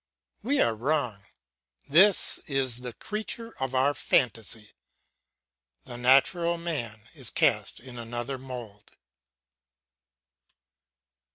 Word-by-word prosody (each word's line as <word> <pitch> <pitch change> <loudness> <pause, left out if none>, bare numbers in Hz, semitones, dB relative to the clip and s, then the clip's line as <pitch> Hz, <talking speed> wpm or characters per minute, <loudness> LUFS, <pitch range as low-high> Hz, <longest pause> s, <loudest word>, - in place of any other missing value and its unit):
We 270 +6 +1
are 115 - +3
wrong; 120 -4 -1 0.6
this 185 +7 +5
is 130 -4 -1
the 125 -1 -6
creature 220 - -5
of 130 0 -2
our 135 +3 +3
fantasy; 110 -5 0 1.1
the 120 - -8
natural 140 +8 +3
man 140 -11 -3
is - - -6
cast - - +1
in 125 -1 -9
another 120 +3 -4
mould. 120 -6 -9
130 Hz, 95 wpm, -27 LUFS, 115-155 Hz, 1.1 s, this